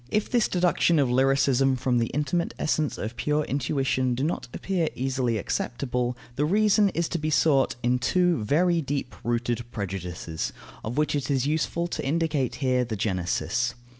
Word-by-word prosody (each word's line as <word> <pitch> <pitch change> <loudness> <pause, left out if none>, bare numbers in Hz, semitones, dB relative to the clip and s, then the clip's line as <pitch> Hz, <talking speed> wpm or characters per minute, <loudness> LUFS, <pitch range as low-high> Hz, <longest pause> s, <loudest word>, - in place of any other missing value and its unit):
If 210 +9 -1
this 240 -3 +3
deduction 175 -2 +2
of 135 -4 +2
lyricism 135 0 +3
from 125 -1 +1
the 115 - +1
intimate 150 +6 -1
essence 155 -1 0
of 110 +3 -5
pure 150 +3 0
intuition 130 -2 0
do 130 - -2
not 160 -3 -2
appear 180 -1 -1
easily 130 -3 0
acceptable, 125 +3 -2 0.2
the 145 - +2
reason 205 +4 +4
is 170 -1 +1
to 170 - -2
be 155 +1 -1
sought 140 -3 +3
in 125 +1 +2
two 180 - +2
very 170 +8 +2
deep 140 -3 -3
rooted 120 0 -1
prejudices, 90 -5 -4 0.3
of 115 +5 -4
which 150 0 +1
it 145 -2 -2
is 135 -2 +1
useful 160 +3 0
to - - -3
indicate 150 -2 0
here 125 -1 +3
the 115 -2 -4
genesis. 95 +3 -1
135 Hz, 165 wpm, -26 LUFS, 120-155 Hz, 0.3 s, reason